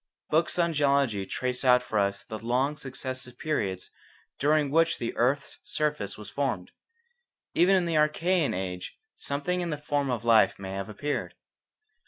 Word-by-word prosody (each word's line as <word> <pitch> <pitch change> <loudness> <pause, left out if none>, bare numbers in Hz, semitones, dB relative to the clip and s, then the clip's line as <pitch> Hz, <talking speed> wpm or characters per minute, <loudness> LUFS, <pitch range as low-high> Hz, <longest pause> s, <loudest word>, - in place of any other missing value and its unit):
Books 160 +3 +2
on 170 -1 +2
geology 140 -9 +2
trace 125 0 -2
out 125 -1 +5
for 110 -3 -1
us 100 0 0
the 110 - -7
long 125 +6 0
successive 130 -2 -5
periods 100 -12 -2 0.5
during 150 0 +2
which 165 +2 +3
the 115 - -3
earth's 135 +4 0
surface 150 -10 -2
was 105 - -9
formed. 130 -11 -2 0.8
Even 180 +3 +5
in 185 -2 +2
the 165 -2 +1
Archaean 155 - +2
age 90 -1 -5 0.2
something 165 +6 -2
in 175 - -2
the 150 - -2
form 145 -1 -1
of 120 -2 -2
life 115 -2 +5
may 95 -1 -6
have 95 +2 -4
appeared. 145 +8 -3
135 Hz, 160 wpm, -28 LUFS, 110-150 Hz, 0.8 s, out